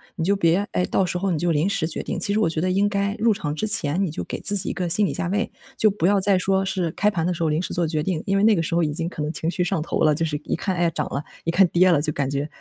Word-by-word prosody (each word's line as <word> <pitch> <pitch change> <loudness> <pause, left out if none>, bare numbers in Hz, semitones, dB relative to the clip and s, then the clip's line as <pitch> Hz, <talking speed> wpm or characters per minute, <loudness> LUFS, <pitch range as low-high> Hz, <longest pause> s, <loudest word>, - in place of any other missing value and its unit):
“你 165 - -3
就 200 +2 +2
别 190 +2 +2
哎， 180 - +1
到 190 - +1
时 180 - -2
候 195 - -1
你 160 - 0
就 175 +1 +1
临 160 +5 +1
时 195 -6 -1
决 165 - -4
定， - - -4
其 200 - 0
实 215 - +1
我 210 - +2
觉 160 - -2
得 185 0 0
应 200 +2 +2
该 200 0 -1
入 230 0 +3
场 150 -6 -4
之 215 - -2
前 170 -2 +2
你 185 - -1
就 - - -5
给 - - -6
自 205 0 +3
己 - - +2
一 - - -2
个 180 -2 -3
心 205 +5 +3
理 - - -2
价 185 - -3
位， 205 +5 -1 0.3
就 215 - +4
不 190 -3 0
要 200 0 +3
再 195 -1 +3
说 190 +1 +1
是 185 -4 -2
开 210 +5 +1
盘 165 -3 -2
的 180 - 0
时 170 0 -3
候 160 - +1
临 155 +3 0
时 - - -5
做 170 -2 0
决 155 -1 -1
定。 170 -2 -2
因 195 0 +2
为 200 - +2
那 220 -1 +5
个 165 - 0
时 165 - -4
候 170 - +3
已 150 - 0
经 165 +3 -2
可 155 - -7
能 150 - -2
情 160 +2 -2
绪 180 - -1
上 170 - -1
头 - - -3
了， 155 -1 +4
就 165 - -1
是 150 -2 -2
一 - - -1
看， 185 +2 -2
“哎， 175 -1 +2
涨 - - -3
了”， 140 +2 -2 0.2
一 165 - +1
看 185 +2 +5
“跌 185 +1 +4
了”， 150 -4 +3
就 150 0 -2
感 140 -2 -1
觉 140 +2 -2
175 Hz, 380 characters per minute, -23 LUFS, 160-195 Hz, 0.3 s, 那